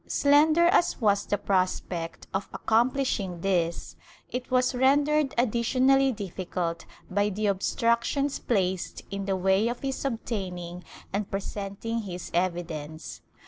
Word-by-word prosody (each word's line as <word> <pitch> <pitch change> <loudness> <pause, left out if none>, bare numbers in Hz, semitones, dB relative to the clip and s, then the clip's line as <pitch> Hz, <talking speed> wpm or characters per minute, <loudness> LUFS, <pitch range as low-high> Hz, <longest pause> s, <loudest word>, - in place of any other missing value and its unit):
Slender 305 +4 +4
as 345 0 +3
was 205 -4 +2
the 205 - +1
prospect 185 -3 -1
of 195 +1 -2
accomplishing 225 -6 +1
this, 170 -3 -1 0.3
it 250 0 -4
was 255 +1 +2
rendered 285 +3 +3
additionally 255 +3 +3
difficult 180 -5 -4 0.2
by 205 +2 +2
the 210 +2 -2
obstructions 235 +7 +1
placed 190 -5 -1
in 200 0 -3
the 195 -1 0
way 190 +3 +2
of 240 +1 -3
his 270 -1 -3
obtaining 185 -8 -4 0.3
and 200 0 -2
presenting 200 +3 -4
his 180 -5 -6
evidence. 165 -3 -3
205 Hz, 120 wpm, -27 LUFS, 185-255 Hz, 0.3 s, Slender